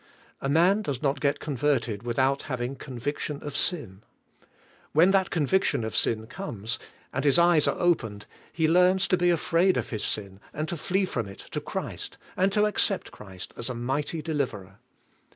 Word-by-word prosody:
A 135 - -1
man 175 +8 +4
does 140 - -4
not 140 0 +1
get 145 0 +1
converted 135 -7 0
without 130 +3 +1
having 125 0 -2
conviction 140 +3 -4
of 145 -2 -6
sin. 115 - -1 0.9
When 170 +5 +6
that 190 -2 +3
conviction 165 -4 +1
of 110 - -4
sin 110 -1 +1
comes, 115 - -4 0.3
and 135 - -1
his 145 +1 +5
eyes 170 -3 +5
are - - +1
opened, 115 -13 +1 0.3
he 160 -1 +1
learns 180 +3 +4
to - - +5
be 175 0 +3
afraid 170 +2 +3
of - - -3
his 110 - -2
sin, 100 -2 -3 0.2
and 155 +2 -2
to - - -2
flee 190 +4 0
from 115 - -3
it 100 - -11
to - - -2
Christ, - - -5 0.2
and 190 +2 +2
to 210 +1 +3
accept 205 -2 0
Christ 95 -3 -10
as 115 - -5
a 125 - -3
mighty 140 +6 -2
deliverer. 120 - -3
145 Hz, 175 wpm, -27 LUFS, 120-175 Hz, 0.9 s, When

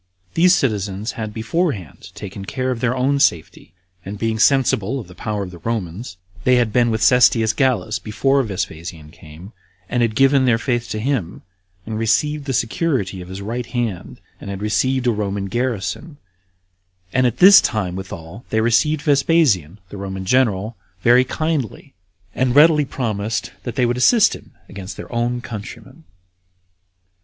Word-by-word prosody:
These 180 +2 +5
citizens 105 - -1
had 110 -3 -5
beforehand 115 - -3
taken 100 -1 -8
care 130 +4 -2
of 125 - -3
their 125 +2 0
own 140 +2 +1
safety, 85 - 0 0.3
and 100 +3 -7
being 110 +1 -2
sensible 130 -2 +2
of 110 - -9
the 90 - -13
power 105 +2 -4
of 90 - -8
the 85 - -11
Romans, 95 -1 -4 0.3
they 125 - +4
had 120 -4 +1
been 120 -1 +3
with 110 0 -1
Cestius 120 -3 +4
Gallus 120 -4 0
before 135 +6 +1
Vespasian 85 - -5
came, 80 +6 -13 0.3
and 120 +4 -1
had 115 -2 0
given 135 +1 +4
their 120 -3 +3
faith 120 0 -2
to 110 - -3
him, 110 -7 -2 0.4
and 110 0 -4
received 150 +6 0
the 135 - -2
security 115 - -1
of 90 - -10
his 95 +2 -7
right 115 +3 -4
hand, 115 -8 -4 0.2
and - - -9
had 100 -1 -5
received 130 +5 0
a 120 - +3
Roman 100 -2 -2
garrison; 120 - -3 1.0
and 130 -1 +3
at 120 0 -3
this 195 +5 +9
time 95 -5 -2
withal 95 +2 -8
they 110 - +1
received 140 +7 +2
Vespasian, 140 - +2
the 100 - -9
Roman 95 -1 -5
general, 110 -2 +1 0.3
very 120 +2 +6
kindly, 150 - -3 0.4
and 130 -1 0
readily 150 0 +6
promised 110 -5 -3
that 120 - -6
they 125 - +2
would 120 +1 0
assist 215 - +4
him - - -15
against 100 -1 -9
their - - -9
own 120 +1 -1
countrymen. 125 +8 -9
115 Hz, 165 wpm, -20 LUFS, 100-130 Hz, 1.0 s, this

